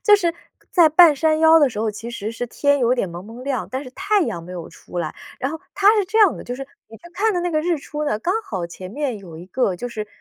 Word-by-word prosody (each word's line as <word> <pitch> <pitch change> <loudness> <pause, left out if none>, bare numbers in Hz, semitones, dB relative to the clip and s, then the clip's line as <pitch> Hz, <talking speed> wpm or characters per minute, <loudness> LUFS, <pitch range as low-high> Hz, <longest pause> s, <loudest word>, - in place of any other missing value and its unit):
就 420 -2 +7
是 345 -4 0 0.4
在 340 -4 +6
半 320 0 +7
山 310 +2 +2
腰 320 0 +7
的 290 -4 +4
时 210 - -7
候， 220 0 0
其 225 +3 -8
实 220 -1 -5
是 245 +2 -4
天 285 +4 +1
有 245 -1 +3
点 240 -7 -1
蒙 175 +2 -8
蒙 230 +4 -10
亮， 270 -4 -2
但 260 +2 -3
是 255 - -10
太 405 +5 +1
阳 170 - -3
没 180 +2 -10
有 175 -2 -7
出 180 - -9
来。 160 -3 -3 0.2
然 265 +2 -2
后 320 - -6
它 395 0 0
是 415 - +2
这 430 +4 -1
样 410 -6 +5
的， - - -8
就 245 - -5
是 270 +1 -7 0.2
你 225 - -12
去 - - -25
看 430 +4 +1
的 355 - 0
那 350 0 -1
个 310 -2 +1
日 340 0 0
出 300 +1 -5
呢， 215 -8 0
刚 355 - -1
好 185 - -4
前 185 +2 -9
面 260 -2 -3
有 175 -5 -11
一 170 +3 -10
个 195 -1 0
就 245 - -5
是 215 -3 -5
265 Hz, 310 characters per minute, -21 LUFS, 210-325 Hz, 0.4 s, 就